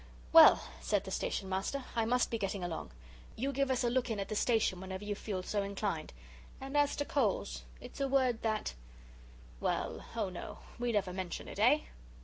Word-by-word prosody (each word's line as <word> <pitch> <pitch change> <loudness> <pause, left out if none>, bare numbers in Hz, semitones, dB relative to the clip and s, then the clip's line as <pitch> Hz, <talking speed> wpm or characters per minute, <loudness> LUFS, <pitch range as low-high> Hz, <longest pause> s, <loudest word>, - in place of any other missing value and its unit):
"Well," - - +9 0.2
said - - 0
the - - -7
Station 195 - -2
Master, 195 +9 -2
"I 230 -1 +2
must 245 +2 +2
be 230 - -1
getting 195 -2 -2
along. 175 -2 -4 0.5
You 270 +4 -1
give 275 0 +1
us 255 -2 +1
a 240 - +3
look 255 0 +1
in 220 -2 -2
at 195 - -3
the 215 - -2
Station 220 -5 +2
whenever 190 +1 -6
you 205 0 -2
feel 200 -2 -4
so 205 +2 -1
inclined. 200 -5 -3 0.5
And 270 +2 -6
as 290 -1 +3
to 290 - -1
coals, - - 0 0.2
it's - - -9
a 275 - +2
word 260 -4 +2
that 215 - -1 0.9
well 80 - -1
oh, 215 -4 0
no, 180 - -7 0.2
we 240 0 0
never 195 -4 0
mention 185 -2 -4
it, - - -7
eh?" - - +5
215 Hz, 195 wpm, -33 LUFS, 190-250 Hz, 0.9 s, Well